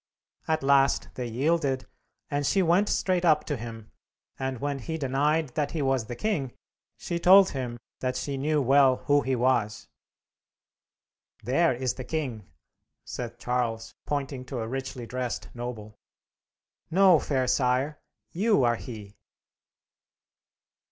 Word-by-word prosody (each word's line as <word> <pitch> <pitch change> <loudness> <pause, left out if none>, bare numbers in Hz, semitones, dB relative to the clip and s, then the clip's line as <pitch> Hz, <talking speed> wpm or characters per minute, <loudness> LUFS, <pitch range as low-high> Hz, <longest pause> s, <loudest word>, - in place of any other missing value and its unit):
At 160 -2 0
last 135 0 +3
they 125 -1 -4
yielded, 135 +2 0 0.5
and 145 0 0
she 190 +6 +2
went 180 +5 +3
straight 185 -2 +1
up 155 -3 +4
to 145 - -3
him, 115 -2 -8 0.5
and 130 -1 -2
when 140 +1 -2
he 160 +6 -4
denied 145 +2 +1
that 145 +3 -2
he 155 -3 -1
was 135 -4 +1
the 120 - -5
king, 140 - -2 0.4
she 170 - -3
told 190 +2 +7
him 125 -3 -4 0.2
that 130 0 -2
she 140 +1 -3
knew 145 +2 +1
well 135 0 +5
who 145 0 +4
he 130 -1 0
was. 120 -4 0 1.5
"There 150 +9 +3
is 130 0 -1
the 130 - -7
king," 125 -10 -4 0.6
said 120 -1 -6
Charles, 120 -2 -2
pointing 140 -3 -3
to 125 -1 -4
a 110 - -3
richly 130 -1 -5
dressed 125 +1 -4
noble. 110 -3 -7 0.9
"No, 185 -1 +6
fair 130 -3 0
sire. 130 +3 +1 0.3
You 205 - +2
are 120 -1 +2
he!" 110 -6 -9
135 Hz, 140 wpm, -27 LUFS, 120-150 Hz, 1.5 s, told